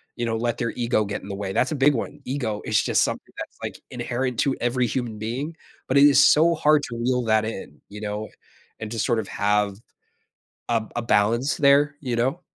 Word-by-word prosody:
you 120 - -2
know, 115 -1 -1
let 120 0 -1
their 115 -1 0
ego 115 -3 0
get 100 0 -4
in - - -10
the 100 - -5
way. 100 -1 -4
That's 130 +9 +1
a - - -1
big 140 +1 +4
one. - - -4
Ego 125 -6 -3
is 105 -1 +1
just - - +2
something - - -4
that's, - - -8
like, - - -6
inherent 125 0 -3
to 135 - +1
every 120 +1 +1
human 115 -3 -3
being, 130 +9 -4 0.3
but, 130 - +2
it 140 - +7
is 145 0 +6
so 165 +2 +5
hard 150 -1 +3
to 115 - -5
reel 125 +1 0
that 110 -1 +3
in, 95 -9 -7
you 105 +1 -9
know, 105 +1 -4 0.5
and 110 - -5
to 115 - -4
sort 115 +1 +1
of 105 - -4
have 105 -1 0 0.9
a 115 -2 +1
a 120 - -1
balance 115 +5 +2
there, 145 +1 +4
you 125 -4 -3
know. 130 +9 0
120 Hz, 220 wpm, -24 LUFS, 110-135 Hz, 0.9 s, it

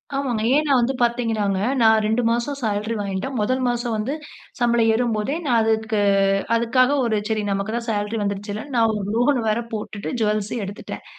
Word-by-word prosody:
ஆமாங்க. 255 -6 -1
ஏன்னா, 300 -1 +2
வந்து 245 +3 +1
பார்த்தீங்கனாங்க. 225 -5 +1 0.2
நான் 220 -1 +5
2 220 +3 +1
மாசம் 240 +4 -1
சேலரி 215 +1 -1
வாங்கிட்டேன். 200 +6 -3
முதல் 255 +5 0
மாசம் 240 -1 -1
வந்து 220 +7 -2 0.5
சம்பளம் 235 -1 +3
ஏறும்போதே 230 +3 0
நான் 240 -4 +3
அதுக்கு 220 -1 0 0.6
அதுக்காக 245 +3 +3
ஒரு 220 -2 +1
சரி 215 -1 0
நமக்கு 200 +3 -2
தான் 235 0 -4
சேலரி 210 +1 -2
வந்துருச்சிலன்னு 205 +6 -4
நான் 225 -1 +4
ஒரு 200 - -4
லோன் 250 +3 +3
வேற 215 - +1
போட்டுட்டு 210 -1 -5
ஜுவல்ஸூம் 215 +1 -1
எடுத்துட்டேன். 200 +2 -8
225 Hz, 160 wpm, -22 LUFS, 210-240 Hz, 0.6 s, நான்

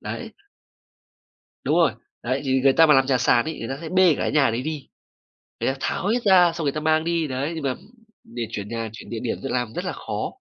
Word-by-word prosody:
đấy. - - -6 1.3
Đúng - - +2
rồi. - - +4 0.3
Đấy, - - -1
thì 130 0 +2
người 135 -1 +5
ta 165 - +6
mà 150 - +6
làm 135 0 +4
nhà 130 -1 +2
sàn 120 +2 +3
ấy, 160 - -5
người 115 - -5
ta 135 - -4
sẽ 160 - -6
bê 185 -2 +5
cả - - -5
cái - - 0
nhà 140 -2 +3
đấy 115 - -2
đi. 150 -1 -5 0.7
Người - - +1
ta 135 - -8
tháo 190 - -2
hết 235 +3 +1
ra 180 -4 +6
xong 165 - -4
người 140 - +1
ta 155 - -3
mang 155 +1 +2
đi, 170 -2 0
đấy, 135 +4 -3
nhưng 160 - -5
mà 130 -2 0 0.5
để 115 +1 -6
chuyển 105 0 -5
nhà, 115 -1 -4
chuyển 115 - -11
địa 115 - -4
điểm 120 - -2
d - - -13
làm 120 -3 -1
rất 180 - -4
là 180 - -2
khó. - - -4
140 Hz, 260 wpm, -23 LUFS, 125-165 Hz, 1.3 s, ta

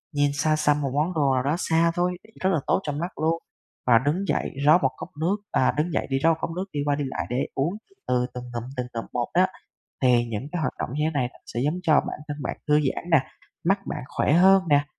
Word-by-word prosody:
nhìn 145 0 +3
xa 155 +2 +2
xăm 150 -1 +2
một 135 -2 -1
món 155 +6 +1
đồ 145 -5 +2
nào 130 -1 +1
đó 145 +4 +1
xa 165 -1 +2
thôi, 180 0 0 0.2
rất 185 - +2
là 170 -5 +2
tốt - - +3
cho 150 - -2
mắt 165 +6 -4
luôn, 160 +1 +2 0.5
và 115 -2 +7
đứng 180 +7 0
dậy, - - 0
rót 155 +3 +8
một 135 - +4
cốc - - -7
nước, 180 +5 +2 0.2
à, 130 - +3
đứng 160 +4 0
dậy - - -1
đi 135 - +1
rót 165 +3 +4
cốc - - -2
nước, 185 +2 -2
đi 145 - -2
qua 145 -1 +2
đi 145 - -2
lại 130 - -3
để 125 +2 -1
uống 150 +7 0 0.3
từ 125 -1 +2
từng 125 - -6
ngụm, 120 -1 -3
từng 125 -1 -2
ngụm 115 -1 -4
một 120 -1 0
đó. 180 +2 +5 0.6
Thì 125 -2 +4
những 115 +5 -4
cái 175 - -1
hoạt 155 - 0
động - - -3
như 150 - -1
thế - - +1
này 130 -4 +1
nó - - -19
sẽ 120 - -4
giống 155 +5 0
cho 160 -4 +4
bản - - +1
thân 145 - -4
bạn - - -3
thư 150 - +5
giãn 150 +4 -2
nè, 160 -4 +6 0.4
mắt 195 +4 +3
bạn - - -4
khỏe - - +1
hơn 190 +3 +6
nè, 145 -1 +4
150 Hz, 265 wpm, -25 LUFS, 135-170 Hz, 0.6 s, rót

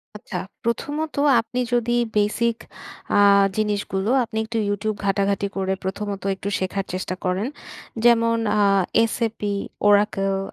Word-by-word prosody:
আচ্ছা, 205 -2 -6 0.3
প্রথমত 295 +7 -2 0.3
আপনি 250 +2 -5
যদি 240 0 +1 0.2
বেসিক 225 +3 +1 0.6
আ - - +5 0.4
জিনিসগুলো, 205 -1 -1
আপনি 220 -1 -6
একটু 225 +1 -4
YouTube 205 +1 -2
ঘাটাঘাটি 200 0 +1
করে 190 0 0
প্রথমত 200 +1 -4
একটু 200 +1 -5
শেখার 190 +1 -2
চেষ্টা 185 0 -3
করেন। 185 +6 0 0.6
যেমন 230 -1 +4 0.2
আ - - +4 0.5
SAP, 230 -2 -2 0.5
Oracle, 200 -1 +3
205 Hz, 120 wpm, -22 LUFS, 195-230 Hz, 0.6 s, আ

